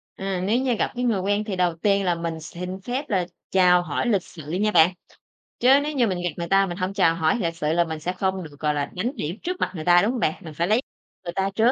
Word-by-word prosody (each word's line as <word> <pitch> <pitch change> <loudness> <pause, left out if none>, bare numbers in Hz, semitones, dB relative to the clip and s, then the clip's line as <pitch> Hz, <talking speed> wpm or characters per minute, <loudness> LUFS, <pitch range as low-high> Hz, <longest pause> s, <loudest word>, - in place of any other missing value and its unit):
À, 190 -2 -3
nếu 215 +5 +2
như 260 -1 +1
gặp - - -1
cái 245 - -2
người 225 -5 +1
quen 205 +2 0
thì 210 -3 -4
đầu 180 -2 +1
tiên 200 +3 +1
là 175 -1 +2
mình 170 -1 -4
xin 180 +4 -7
phép 260 +6 -4
là 185 -4 +1 0.3
chào 180 -2 +5
hỏi 175 - -2
lịch 200 -6 +2
sự 155 -3 -10
nha 205 +5 +1
bạn. 170 -1 +5 0.7
Chớ 260 +3 +6
nếu 300 +1 -3
như 245 -4 +3
mình 185 -3 -1
gặp 175 - +1
người 170 - -3
ta 195 0 +4
mình 175 -2 -5
hông 190 0 -2
chào 180 -5 +3
hỏi 160 +5 +1
lịch 165 -5 -1
sự 150 -2 -1
là 170 +1 +3
mình 160 -2 -5
sẽ 180 +4 -3
không 190 0 -1
được, 145 -3 -12
gọi 150 -1 +1
là, 145 -1 -1
đánh 215 +8 -1
điểm 175 - -3
trước 360 +1 -3
mặt - - 0
người 155 -2 -5
ta, 175 0 +6
đúng 215 - +1
hông 250 - -3
bạn? 155 - +1
Mình 160 - -8
phải 170 +3 -1
lấy 220 +5 +3 0.4
người 175 -1 -5
ta 195 +2 0
trước. 225 +3 +4
185 Hz, 285 wpm, -24 LUFS, 170-210 Hz, 0.7 s, Chớ